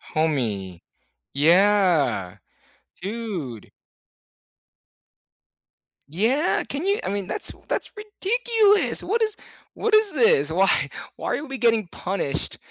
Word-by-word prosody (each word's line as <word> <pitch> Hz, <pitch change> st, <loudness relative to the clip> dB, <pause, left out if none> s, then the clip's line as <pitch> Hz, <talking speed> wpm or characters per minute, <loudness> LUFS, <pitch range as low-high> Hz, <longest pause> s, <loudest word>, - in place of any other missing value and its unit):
Homie, 110 Hz, -, -2 dB, 0.5 s
yeah, 170 Hz, -, +2 dB, 0.7 s
dude! 190 Hz, -, -6 dB, 2.4 s
Yeah, 230 Hz, -, +1 dB
can 290 Hz, +6 st, -4 dB
you 400 Hz, +1 st, +1 dB
I -, -, -3 dB
mean, 200 Hz, -1 st, -3 dB
that's -, -, +2 dB, 0.2 s
that's -, -, -2 dB
ridiculous. 425 Hz, 0 st, +1 dB
What 455 Hz, +4 st, -1 dB
is 435 Hz, -1 st, 0 dB, 0.4 s
what 455 Hz, -, -2 dB
is 430 Hz, -2 st, +5 dB
this? 220 Hz, -, +3 dB
Why 190 Hz, +4 st, +2 dB, 0.5 s
why -, -, -3 dB
are 295 Hz, -, -7 dB
we 270 Hz, -2 st, -6 dB
getting 230 Hz, -5 st, +1 dB
punished 170 Hz, -5 st, -3 dB
205 Hz, 105 wpm, -23 LUFS, -, 2.4 s, is